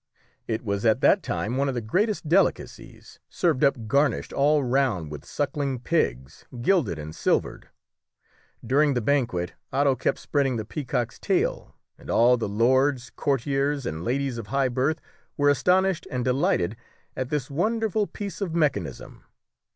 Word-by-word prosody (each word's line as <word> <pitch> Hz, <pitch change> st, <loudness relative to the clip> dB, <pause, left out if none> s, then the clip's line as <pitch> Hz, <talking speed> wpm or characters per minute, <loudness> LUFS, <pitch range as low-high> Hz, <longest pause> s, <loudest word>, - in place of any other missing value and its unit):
It 110 Hz, 0 st, -2 dB
was 100 Hz, -1 st, -2 dB
at 110 Hz, -2 st, +3 dB
that -, -, +5 dB
time 120 Hz, +5 st, -2 dB
one 140 Hz, +1 st, +1 dB
of 130 Hz, -, -3 dB
the -, -, 0 dB
greatest 185 Hz, -, -1 dB
delicacies, 185 Hz, +5 st, -1 dB
served 165 Hz, -7 st, 0 dB
up 135 Hz, -5 st, +2 dB
garnished 140 Hz, +2 st, +1 dB
all 145 Hz, +1 st, +3 dB
round 120 Hz, -, 0 dB
with 75 Hz, -1 st, -7 dB
sucking 140 Hz, -1 st, -2 dB
pigs, 65 Hz, -, -1 dB, 0.2 s
gilded 125 Hz, -, +1 dB
and 75 Hz, 0 st, -7 dB
silvered. -, -, -1 dB, 1.0 s
During 140 Hz, +3 st, +3 dB
the -, -, +2 dB
banquet 110 Hz, -9 st, 0 dB, 0.2 s
Otto 140 Hz, 0 st, +2 dB
kept 130 Hz, -, -1 dB
spreading 140 Hz, -3 st, 0 dB
the 110 Hz, -2 st, -3 dB
peacock's 120 Hz, -3 st, -3 dB
tail, -, -, -1 dB, 0.2 s
and -, -, -13 dB
all 120 Hz, +2 st, +5 dB
the 115 Hz, -4 st, -3 dB
lords, 125 Hz, +4 st, +2 dB
courtiers, 140 Hz, 0 st, 0 dB
and 80 Hz, +1 st, -4 dB
ladies 130 Hz, +2 st, -1 dB
of 110 Hz, -, -7 dB
high 135 Hz, +1 st, +1 dB
birth 135 Hz, +6 st, 0 dB, 0.4 s
were 145 Hz, 0 st, +3 dB
astonished 180 Hz, +4 st, +2 dB
and 125 Hz, -1 st, -2 dB
delighted 125 Hz, -, +1 dB, 0.4 s
at 130 Hz, -1 st, -3 dB
this 145 Hz, -3 st, -2 dB
wonderful 215 Hz, +5 st, 0 dB
piece 205 Hz, -1 st, -7 dB
of 175 Hz, -4 st, -2 dB
mechanism. 145 Hz, -, -2 dB
135 Hz, 150 wpm, -25 LUFS, 115-150 Hz, 1.0 s, that